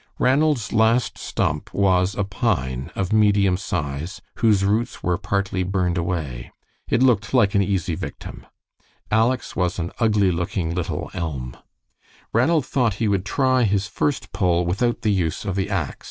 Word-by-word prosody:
Ranald's 135 -3 +2
last 115 +2 +2
stump 75 0 -2
was 95 -1 +2
a 105 - 0
pine 90 - -1
of 95 +2 -1
medium 100 -3 +4
size, 80 -2 -4 0.2
whose 105 -4 +3
roots 110 +3 -1
were 90 0 0
partly 95 -1 -1
burned 90 -1 0
away. 80 -9 -3 0.4
It 125 - +3
looked 115 -2 +2
like 105 -6 +4
an 100 - +3
easy 95 -3 0
victim. - - -7 0.6
Aleck's 115 +3 +1
was 90 -1 0
an 85 0 -3
ugly 105 -5 +3
looking 85 -1 -2
little 90 -1 -3
elm. 65 -7 -4 0.8
Ranald 140 +5 +3
thought 120 -6 +1
he 110 - -1
would 100 -2 0
try 130 +2 +2
his 100 -3 +1
first 105 0 -2
pull 90 -2 +1
without 115 +8 0
the 110 - +2
use 90 -2 -1
of 100 -3 -2
the 95 0 -1
ax. 95 -8 -2
100 Hz, 155 wpm, -22 LUFS, 90-110 Hz, 0.8 s, medium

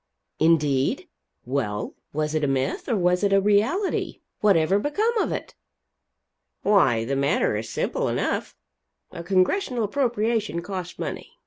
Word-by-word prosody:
"Indeed? 150 -5 +2 0.4
Well, 120 -5 -2 0.2
was 150 +1 -2
it 155 -1 0
a - - +2
myth, 135 -1 -1
or 235 - +2
was 180 0 +1
it 200 - +2
a 195 - +5
reality? 215 - +1 0.2
Whatever 195 -2 +3
become 415 - 0
of - - 0
it?" - - -5 1.1
"Why 120 - +3
the 135 +3 -1
matter 140 -5 +1
is 110 +1 -4
simple - - -1
enough. - - -2 0.6
A 170 - -7
Congressional 225 - +1
appropriation 225 -6 0
costs 185 -2 -6
money. - - -6
185 Hz, 135 wpm, -24 LUFS, 145-215 Hz, 1.1 s, a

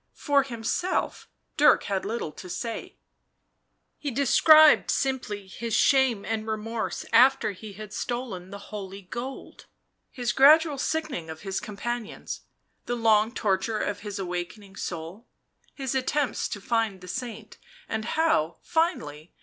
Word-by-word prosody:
For 285 -1 +3
himself 270 +8 -2 0.3
Dirk 300 0 +6
had 195 -2 -2
little 220 -6 -3
to 180 +4 -11
say; 230 +5 -5 1.0
he 290 - -3
described 300 +4 +6
simply 250 -7 -1
his 225 +4 -4
shame 265 -7 +3
and 220 -1 -3
remorse 220 +1 -3
after 255 0 +5
he 205 +2 -10
had 210 +1 -9
stolen 235 -7 -4
the 200 - -7 0.2
holy 195 -1 -7
gold, 245 +8 -7 0.4
his 245 -2 -2
gradual 300 +2 +6
sickening 305 - -2
of 160 0 -8
his 195 -1 -3
companions, 225 +2 -5 0.5
the 245 - -1
long 220 -1 +3
torture 215 -1 0
of 205 -1 -2
his 205 -1 -6
awakening 190 +2 -5
soul, 175 +6 -6 0.5
his 270 -3 -3
attempts 265 -1 0
to 205 - -5
find 220 -2 -1
the 180 - -11
saint, 225 0 -6 0.3
and 220 0 -3
how, 235 - +1
finally 180 - -1
225 Hz, 135 wpm, -26 LUFS, 200-265 Hz, 1.0 s, Dirk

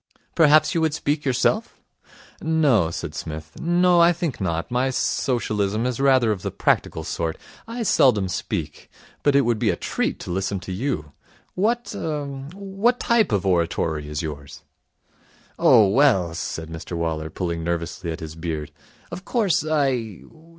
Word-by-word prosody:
'Perhaps 155 -1 +5
you 165 - +1
would 160 -2 +1
speak 150 -1 -1
yourself?' 175 - +1 0.6
'No,' 145 - +3
said 85 -2 -5
Psmith. 80 +1 -7
'No. 175 +1 +3
I 170 +1 +6
think 165 - -3
not. 85 0 -2
My 125 +2 +1
Socialism 110 -4 0
is 125 0 -2
rather 130 -4 +4
of 100 -4 -3
the - - -3
practical 80 - 0
sort. 80 0 -3 0.3
I 230 +1 -4
seldom 110 - +3
speak. 90 - -4 0.3
But 145 -1 +2
it 140 - +6
would 120 -4 0
be - - +2
a - - +1
treat - - -2
to - - -6
listen 95 +2 -1
to 95 - -7
you. 95 - -3 0.4
What 235 +5 0
er 150 -2 -3 0.3
what 200 +5 0
type 230 - +2
of 100 -2 0
oratory 85 -4 0
is 75 +1 -3
yours?' 70 -2 -7 1.0
'Oh, 105 - +6
well,' 95 - +3
said 80 0 -5
Mr 80 +2 -7
Waller, 80 -2 -2
pulling 85 -1 -3
nervously 85 +1 -3
at 80 +3 -6
his 80 -1 -6
beard, 80 -3 -4 0.4
'of 185 - -7
course 200 - +1
I 135 - -1
110 Hz, 155 wpm, -23 LUFS, -, 1.0 s, I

